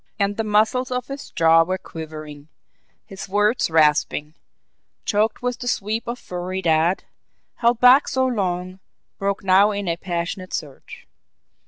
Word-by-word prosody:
And 200 Hz, -1 st, 0 dB
the 225 Hz, -, -1 dB
muscles 220 Hz, +5 st, +1 dB
of 250 Hz, 0 st, -3 dB
his 275 Hz, +1 st, -7 dB
jaw 165 Hz, -1 st, +4 dB
were 185 Hz, +3 st, -1 dB
quivering, 155 Hz, -4 st, -9 dB, 0.6 s
his 195 Hz, 0 st, -9 dB
words 210 Hz, +3 st, +2 dB
rasping, 150 Hz, -1 st, +2 dB, 0.7 s
choked 215 Hz, +3 st, 0 dB
with 250 Hz, -1 st, -2 dB
the 245 Hz, -, -6 dB
sweep 220 Hz, 0 st, -2 dB
of 240 Hz, +1 st, -3 dB
fury 180 Hz, -2 st, -5 dB
that, 165 Hz, +2 st, +2 dB, 0.5 s
held 235 Hz, 0 st, +2 dB
back 250 Hz, +3 st, +6 dB
so 260 Hz, 0 st, +1 dB
long, 185 Hz, -6 st, -2 dB, 0.4 s
broke 200 Hz, +1 st, -2 dB
now 195 Hz, +2 st, +5 dB
in 200 Hz, -2 st, -3 dB
a 170 Hz, 0 st, -1 dB
passionate 180 Hz, +1 st, -4 dB
surge. 470 Hz, -1 st, -8 dB
195 Hz, 145 wpm, -22 LUFS, 170-230 Hz, 0.7 s, back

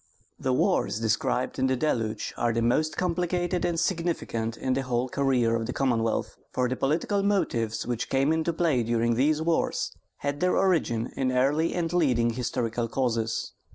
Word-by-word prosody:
The 130 Hz, -, 0 dB
wars 125 Hz, -3 st, +1 dB
described 115 Hz, +4 st, 0 dB
in 130 Hz, -, +3 dB
THE 130 Hz, -, +2 dB
DELUGE 115 Hz, -6 st, -1 dB
are 120 Hz, -, +1 dB
the 115 Hz, 0 st, 0 dB
most 155 Hz, +6 st, +1 dB
complicated 175 Hz, 0 st, 0 dB
and 170 Hz, -1 st, 0 dB
significant 165 Hz, -, -1 dB
in 130 Hz, -, -1 dB
the 135 Hz, -, 0 dB
whole 125 Hz, -1 st, -1 dB
career 125 Hz, -4 st, +1 dB
of 115 Hz, -1 st, -2 dB
the 125 Hz, -, -3 dB
Commonwealth, 115 Hz, -4 st, 0 dB
for 125 Hz, 0 st, +1 dB
the 130 Hz, -, -1 dB
political 165 Hz, +10 st, 0 dB
motives 120 Hz, -, 0 dB
which 120 Hz, -1 st, -3 dB
came 135 Hz, +3 st, +2 dB
into 160 Hz, +1 st, 0 dB
play 160 Hz, -6 st, +1 dB
during 115 Hz, 0 st, +1 dB
these 150 Hz, +6 st, +2 dB
wars 165 Hz, 0 st, 0 dB, 0.3 s
had 140 Hz, 0 st, -3 dB
their 180 Hz, +2 st, +2 dB
origin 140 Hz, -11 st, +1 dB
in 130 Hz, -1 st, 0 dB
early 140 Hz, +6 st, +2 dB
and 170 Hz, -1 st, -1 dB
leading 125 Hz, -9 st, +2 dB
historical 120 Hz, -1 st, -2 dB
causes. 115 Hz, -3 st, -1 dB
130 Hz, 170 wpm, -27 LUFS, 115-160 Hz, 0.3 s, in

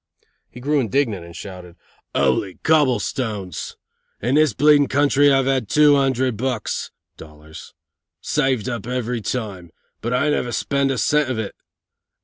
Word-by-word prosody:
He 125 Hz, -, -12 dB
grew 145 Hz, +3 st, +1 dB
indignant 115 Hz, -5 st, 0 dB
and 85 Hz, 0 st, -12 dB
shouted: 90 Hz, -3 st, -9 dB, 0.4 s
"'Oly 70 Hz, +8 st, +1 dB
Cobblestones! 120 Hz, -, 0 dB, 0.4 s
In 120 Hz, +5 st, -1 dB
this 155 Hz, -1 st, +4 dB, 0.4 s
country 145 Hz, +1 st, +3 dB
I 135 Hz, -1 st, +3 dB
have 130 Hz, -4 st, 0 dB
two 150 Hz, +4 st, +5 dB
hundred 130 Hz, -4 st, +1 dB
bucks 125 Hz, -2 st, -3 dB, 0.3 s
(dollars) 75 Hz, 0 st, -13 dB, 0.4 s
saved 135 Hz, -7 st, 0 dB
up 120 Hz, -2 st, -4 dB
every 125 Hz, -2 st, -2 dB
time, 100 Hz, -6 st, -4 dB, 0.3 s
but 120 Hz, -, -3 dB
I 130 Hz, +4 st, +1 dB
never 125 Hz, -4 st, -1 dB
spend 140 Hz, +2 st, 0 dB
a 135 Hz, -, -1 dB
cent 150 Hz, +2 st, +2 dB
of 130 Hz, -, -2 dB
it. 110 Hz, -3 st, -4 dB
125 Hz, 135 wpm, -21 LUFS, 100-140 Hz, 0.4 s, two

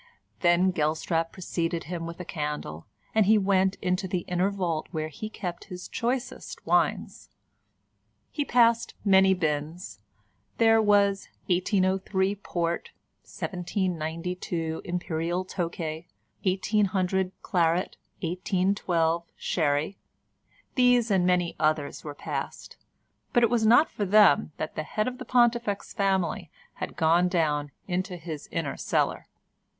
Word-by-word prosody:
Then 175 Hz, +1 st, +4 dB
Gelstrap 165 Hz, +1 st, 0 dB
preceded 170 Hz, -2 st, -3 dB
him 165 Hz, +1 st, -5 dB
with 170 Hz, +1 st, -8 dB
a 180 Hz, -, -6 dB
candle, 150 Hz, -, -4 dB, 0.3 s
and 220 Hz, -3 st, +3 dB
he 220 Hz, +1 st, +6 dB
went 190 Hz, -1 st, +2 dB
into 185 Hz, +1 st, 0 dB
the 180 Hz, -1 st, -1 dB
inner 180 Hz, +2 st, 0 dB
vault 175 Hz, -6 st, -2 dB
where 155 Hz, -2 st, -3 dB
he 215 Hz, +8 st, -6 dB
kept 180 Hz, -5 st, -6 dB
his 180 Hz, -2 st, -8 dB
choicest 250 Hz, +2 st, -3 dB
wines. -, -, 0 dB, 1.0 s
He 295 Hz, -, -1 dB
passed 235 Hz, -3 st, +3 dB
many 190 Hz, -1 st, +6 dB
bins: 155 Hz, +1 st, -3 dB, 0.6 s
there 225 Hz, -1 st, +5 dB
was 200 Hz, -2 st, +3 dB, 0.2 s
1803 190 Hz, +1 st, +1 dB
Port, 170 Hz, -4 st, -3 dB, 0.3 s
1792 175 Hz, -2 st, -3 dB
Imperial 175 Hz, 0 st, -2 dB
Tokay, 170 Hz, -3 st, -4 dB, 0.4 s
1800 190 Hz, -1 st, +1 dB
Claret, 175 Hz, +1 st, +1 dB, 0.3 s
1812 175 Hz, -2 st, 0 dB
Sherry, 155 Hz, +3 st, 0 dB, 0.7 s
these 245 Hz, -3 st, +4 dB
and 185 Hz, -2 st, +3 dB
many 180 Hz, -1 st, +1 dB
others 155 Hz, -2 st, 0 dB
were 145 Hz, -1 st, -7 dB
passed, -, -, -5 dB, 0.6 s
but 240 Hz, -, +4 dB
it 235 Hz, -, +4 dB
was 225 Hz, -2 st, +3 dB
not 240 Hz, +8 st, +6 dB
for 205 Hz, -, -3 dB
them 205 Hz, -4 st, +5 dB
that 155 Hz, -, -4 dB
the -, -, -3 dB
head 215 Hz, +8 st, -2 dB
of 255 Hz, 0 st, -4 dB
the 255 Hz, -, -6 dB
Pontifex 235 Hz, -4 st, +1 dB
family 190 Hz, -4 st, 0 dB, 0.3 s
had -, -, -5 dB
gone 165 Hz, +3 st, +4 dB
down 150 Hz, -5 st, 0 dB, 0.2 s
into 180 Hz, 0 st, -2 dB
his 160 Hz, -3 st, -7 dB
inner 165 Hz, -4 st, -2 dB
cellar. -, -, -1 dB
180 Hz, 125 wpm, -27 LUFS, 165-200 Hz, 1.0 s, he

